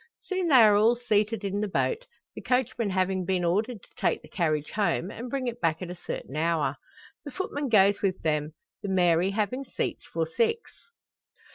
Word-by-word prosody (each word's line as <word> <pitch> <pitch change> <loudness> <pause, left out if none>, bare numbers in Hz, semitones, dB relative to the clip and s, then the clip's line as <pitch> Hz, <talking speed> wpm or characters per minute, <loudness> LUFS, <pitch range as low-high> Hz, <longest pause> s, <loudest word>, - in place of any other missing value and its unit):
Soon 375 -2 -2
they 295 - +4
are 220 -4 +8
all 220 +4 +4
seated 220 -2 0
in 200 +1 -2
the 210 - 0
boat, 475 - -1 0.3
the - - -8
coachman 250 -4 0
having 185 0 0
been 185 -1 0
ordered 210 +5 0
to - - -19
take - - 0
the - - -13
carriage 155 -4 -1
home, 195 -2 0
and 240 +3 -7
bring 270 0 -2
it 240 -1 -4
back 165 -2 +1
at 180 -1 -6
a - - -6
certain 145 -5 -6
hour. 165 0 0 0.5
The 290 - -7
footman 290 -3 -3
goes 200 -2 +4
with 190 -2 0
them 150 0 -1 0.3
the 200 - -4
Mary 180 -1 +3
having 215 +6 -1
seats - - -4
for - - 0
six. 460 -1 -1
205 Hz, 190 wpm, -27 LUFS, 180-245 Hz, 0.5 s, are